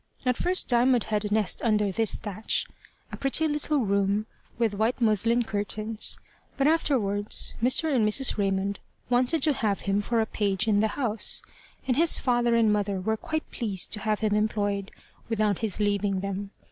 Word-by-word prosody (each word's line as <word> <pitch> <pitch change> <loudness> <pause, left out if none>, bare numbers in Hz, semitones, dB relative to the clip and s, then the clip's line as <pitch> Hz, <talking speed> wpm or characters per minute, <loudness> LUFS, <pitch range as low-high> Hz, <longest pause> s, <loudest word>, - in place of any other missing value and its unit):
At 250 -1 +2
first 365 +7 0
Diamond 245 -1 +3
had 210 -1 -2
a 205 - -4
nest 210 -2 +1
under 210 -3 +1
this 225 +3 0
thatch 210 +1 -2 0.5
a - - -6
pretty 275 +4 +1
little 300 0 0
room 200 +1 +1 0.3
with 230 -3 0
white 220 +5 0
muslin 230 +1 +2
curtains, 215 +1 -2 0.4
but 275 - +1
afterwards 225 -10 +1
Mr. 270 +5 +3
and 235 - +3
Mrs. 265 +5 +4
Raymond 195 -1 -1 0.3
wanted 255 +5 +2
to 300 - +3
have 210 -6 -1
him 200 +1 0
for 230 +3 -1
a 220 - +2
page 205 -1 -1
in 205 -2 +3
the 220 - +3
house, 230 -6 +1 0.4
and 250 -1 +1
his 330 +1 +4
father 240 -2 +1
and 225 -2 +3
mother 200 -2 -1
were 220 +4 -1
quite 315 +7 -5
pleased 200 -7 -2
to 210 - 0
have 215 +1 -1
him 215 -1 +1
employed 205 -2 -1 0.4
without 215 -3 0
his 215 -3 -2
leaving 205 -2 0
them. 200 0 -4
215 Hz, 175 wpm, -26 LUFS, 205-245 Hz, 0.5 s, Mrs